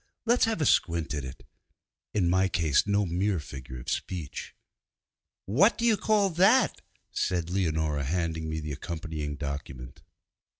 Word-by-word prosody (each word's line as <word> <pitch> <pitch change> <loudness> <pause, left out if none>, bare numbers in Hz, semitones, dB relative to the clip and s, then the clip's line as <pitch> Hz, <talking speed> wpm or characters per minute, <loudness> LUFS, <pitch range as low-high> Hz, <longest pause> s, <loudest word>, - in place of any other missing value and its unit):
'Let's 240 +1 +4
have 225 -7 -1
a - - +2
squint 85 - +2
at 75 -2 -3
it' 65 0 -9 0.7
(in 95 -5 +1
my 95 +2 +3
case 80 -2 +2
no 100 0 +2
mere 90 +2 0
figure 65 -4 -8
of - - -12
speech). 85 -7 -4 0.9
'What 155 - +4
do 230 - -1
you 230 -2 +5
call 205 -1 +2
that?' 195 +10 +4 0.3
said 85 -2 -1
Leonora, 80 -6 0
handing 80 0 -2
me 80 0 -2
the 75 0 -5
accompanying 80 -1 -5
document. 70 -3 -6
85 Hz, 145 wpm, -28 LUFS, 75-105 Hz, 0.9 s, you